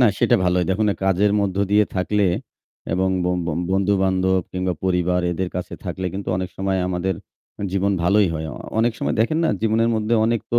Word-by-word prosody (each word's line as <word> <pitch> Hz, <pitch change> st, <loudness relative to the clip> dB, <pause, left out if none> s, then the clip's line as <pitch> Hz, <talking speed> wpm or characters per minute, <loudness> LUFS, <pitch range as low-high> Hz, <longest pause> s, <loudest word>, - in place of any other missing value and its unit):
না 125 Hz, -, +7 dB
সেটা -, -, +4 dB
ভালোই। 90 Hz, 0 st, +2 dB
দেখুন 100 Hz, +3 st, +1 dB
না -, -, 0 dB
কাজের 95 Hz, +2 st, +3 dB
মধ্য 95 Hz, -1 st, -1 dB
দিয়ে 105 Hz, +1 st, +5 dB
থাকলে 100 Hz, +2 st, +1 dB, 0.7 s
এবং 95 Hz, +2 st, +1 dB, 0.2 s
ব -, -, 0 dB, 0.2 s
ব -, -, -2 dB, 0.2 s
বন্ধুবান্ধব 95 Hz, -1 st, +2 dB
কিংবা 90 Hz, 0 st, -1 dB
পরিবার 90 Hz, -1 st, +1 dB
এদের 90 Hz, +1 st, -2 dB
কাছে 90 Hz, -, -5 dB
থাকলে 95 Hz, 0 st, -3 dB
কিন্তু 100 Hz, +1 st, -5 dB
অনেক 95 Hz, 0 st, -2 dB
সময় 95 Hz, 0 st, 0 dB
আমাদের 95 Hz, +1 st, -1 dB, 0.6 s
জীবন 100 Hz, +1 st, +1 dB
ভালোই 100 Hz, +2 st, +4 dB
হয়। 80 Hz, 0 st, -3 dB, 0.3 s
অনেক 115 Hz, +1 st, +3 dB
সময় -, -, -1 dB
দেখেন 155 Hz, +8 st, +2 dB
না -, -, +2 dB
জীবনের 115 Hz, +1 st, +2 dB
মধ্যে 110 Hz, +1 st, +1 dB
অনেক 115 Hz, -1 st, +1 dB
তো 120 Hz, -, +4 dB
95 Hz, 185 wpm, -22 LUFS, 90-105 Hz, 0.7 s, না